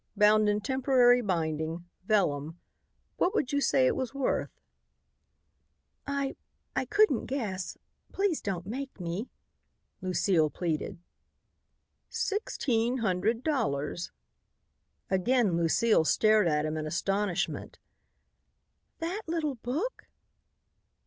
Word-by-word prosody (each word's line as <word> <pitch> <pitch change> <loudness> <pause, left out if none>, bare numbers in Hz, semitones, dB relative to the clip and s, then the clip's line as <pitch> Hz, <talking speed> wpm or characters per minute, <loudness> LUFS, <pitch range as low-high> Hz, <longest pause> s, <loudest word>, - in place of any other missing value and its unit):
Bound 210 0 +5
in 205 0 +1
temporary 250 0 +4
binding, 165 -3 -2 0.2
vellum. 165 -6 +1 0.6
What 375 +4 +1
would 260 - 0
you 285 0 +1
say 265 -1 +3
it - - +2
was 260 0 -3
worth?" 275 -2 0 1.6
"I 280 -1 -2 0.4
I - - 0
couldn't 420 - +3
guess. 205 -9 -3 0.3
Please 390 -5 0
don't 180 -4 -3
make 265 +5 -6
me," 180 +7 -4 0.7
Lucile 180 -3 +2
pleaded. 170 +4 -3 1.1
"Sixteen 255 - 0
hundred 225 +2 0
dollars." 175 - -1 1.0
Again 200 0 +2
Lucile 170 +4 +3
stared 215 +3 +4
at 150 -1 +1
him 155 0 -2
in 155 0 -3
astonishment. 195 +2 -1 1.2
"That 355 +6 -2
little 320 -3 -1
book!" 270 - -4
215 Hz, 100 wpm, -29 LUFS, 175-265 Hz, 1.6 s, Bound